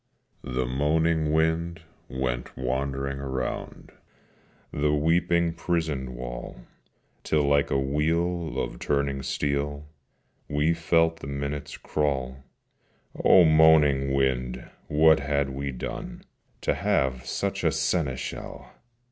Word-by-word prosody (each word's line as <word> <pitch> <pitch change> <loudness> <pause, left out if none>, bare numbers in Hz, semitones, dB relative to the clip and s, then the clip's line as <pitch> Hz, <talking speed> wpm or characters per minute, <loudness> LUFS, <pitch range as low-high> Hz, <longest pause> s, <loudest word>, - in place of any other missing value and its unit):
The 65 -1 -2
moaning 75 +4 +1
wind 80 +1 0 0.3
went 65 -2 -3
wandering 70 +2 -2
round 65 -2 -5 0.8
The 75 +1 +1
weeping 85 +2 +2
prison 80 -7 -2
wall: - - -7 0.6
Till 75 -1 +1
like 70 0 +2
a - - +1
wheel 80 +4 0
of - - -4
turning 70 -1 -1
steel 70 +1 -2 0.6
We 75 +3 +2
felt 80 0 +2
the 70 - -8
minutes 70 +1 -4
crawl: 65 -4 -2 0.9
O 90 - +7
moaning 80 -4 +5
wind! 65 -2 -1 0.2
what 80 +1 +5
had 70 -1 0
we 70 +1 -4
done 65 - -6 0.4
To - - +1
have 65 -1 0
such - - -2
a - - +3
seneschal? 70 -8 -2
70 Hz, 105 wpm, -26 LUFS, 65-80 Hz, 0.9 s, O